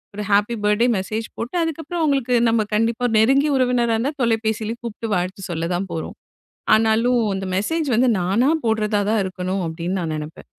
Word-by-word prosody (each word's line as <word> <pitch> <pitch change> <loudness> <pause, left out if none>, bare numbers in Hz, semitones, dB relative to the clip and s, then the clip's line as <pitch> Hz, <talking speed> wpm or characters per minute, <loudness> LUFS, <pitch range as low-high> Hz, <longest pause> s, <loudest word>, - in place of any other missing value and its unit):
ஒரு 210 - -4
happy 205 +4 +3
birthday 210 +4 +3
message 215 +4 -3
போட்டு 240 +8 -5
அதுக்கப்றம் 325 +1 -4
அவுங்களுக்கு 270 -5 +1
நம்ம 225 -2 +1
கண்டிப்பா 230 +2 0
ஒரு 230 - -3
நெருங்கிய 275 +6 +3
உறவினரா 245 -3 +2
இருந்தா 265 +7 -1
தொலைபேசியில 225 -1 0
கூப்ட்டு 230 -1 -5
வாழ்த்து 185 +2 -3
சொல்லத்தான் 175 +3 -2
போறோம். 160 - -5 0.6
ஆனாலும் 225 +3 +2 0.2
இந்த 190 0 -4
மெசேஜ் 310 +10 -1
வந்து 250 +3 +3
நானா 200 +10 +2 0.2
போடறதா 215 -2 +1
தான் 220 -2 +2
இருக்கணும் 185 0 -3
அப்டின்னு 170 +3 -3
நான் 160 -2 -3
நெனப்பேன். 155 +1 -8
220 Hz, 165 wpm, -21 LUFS, 190-245 Hz, 0.6 s, happy